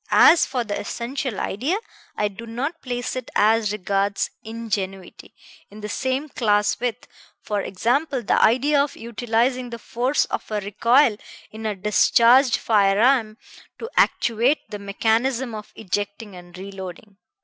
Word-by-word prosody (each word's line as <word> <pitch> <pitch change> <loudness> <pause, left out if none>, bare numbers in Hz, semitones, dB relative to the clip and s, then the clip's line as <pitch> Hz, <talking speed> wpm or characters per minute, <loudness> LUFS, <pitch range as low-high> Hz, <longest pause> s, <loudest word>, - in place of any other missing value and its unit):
As 335 - +6
for 255 -2 -2
the 205 -3 -4
essential 250 +2 -4
idea, 275 - -1 0.4
I 210 - +1
do 210 +3 -9
not 275 +9 -4
place 245 -1 -4
it, 255 -2 -5
as 215 0 +3
regards 200 0 -1
ingenuity, 200 -5 -5 0.3
in 210 +1 -12
the 210 - -5
same 260 +5 -2
class 210 -6 +1
with, 245 -1 -3 0.4
for 205 -1 -2
example, 245 - -1
the - - +2
idea 280 +5 +4
of 290 - -6
utilizing 240 +2 -1
the 235 - -6
force 245 +5 0
of - - -5
recoil 215 +4 +2 0.3
in 220 0 -5
a 210 - -2
discharged 235 +5 +4
firearm 215 +2 +3 0.4
to 455 +1 -7
actuate 235 +6 +2
the 210 - -5
mechanism 230 +5 0
of 215 -1 -8
ejecting 205 0 -4
and 175 0 -13
reloading. 195 +1 -9
225 Hz, 140 wpm, -22 LUFS, 205-250 Hz, 0.4 s, As